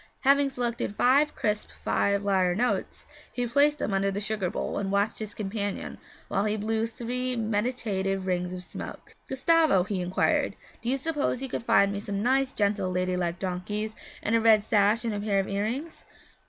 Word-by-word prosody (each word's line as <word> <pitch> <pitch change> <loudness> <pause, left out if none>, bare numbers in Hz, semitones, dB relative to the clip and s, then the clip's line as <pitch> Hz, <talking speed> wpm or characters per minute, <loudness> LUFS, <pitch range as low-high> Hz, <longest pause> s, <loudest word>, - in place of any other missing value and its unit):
Having 280 +1 +4
selected 240 -5 -3
five 280 +6 +3
crisp 210 -1 -1 0.2
five 200 0 +1
lire 185 -3 +2
notes, 245 +5 -1 0.3
he 245 - -2
placed 285 +5 +3
them 215 - -2
under 195 0 +2
the 195 +1 -2
sugar 205 -3 -1
bowl, - - -3
and 195 -1 -2
watched 200 +2 +1
his 215 -2 -6
companion 205 -1 -4 0.3
while 195 - 0
he 215 0 0
blew 220 +2 0
three 250 +2 -2
meditative 210 -4 -1
rings 180 -1 -1
of 180 0 -6
smoke. - - -9 0.2
'Gustavo,' 300 - +4
he 195 -1 -2
inquired, 180 +1 +1 0.3
'do 235 - -2
you 270 - +2
suppose 285 -3 -1
you 265 - -4
could - - -3
find 200 -4 +3
me 200 - -3
some 200 0 -3
nice, 265 +2 +2
gentle, 200 -4 0
lady 185 0 0
like 175 -1 -1
donkeys, 200 +4 -3 0.3
and 225 - +1
a 230 - +3
red 220 -2 +5
sash 210 +2 +2
and 225 - 0
a 205 - -2
pair 205 -1 +1
of 195 - -1
earrings?' 230 +11 -3
210 Hz, 185 wpm, -27 LUFS, 195-245 Hz, 0.3 s, red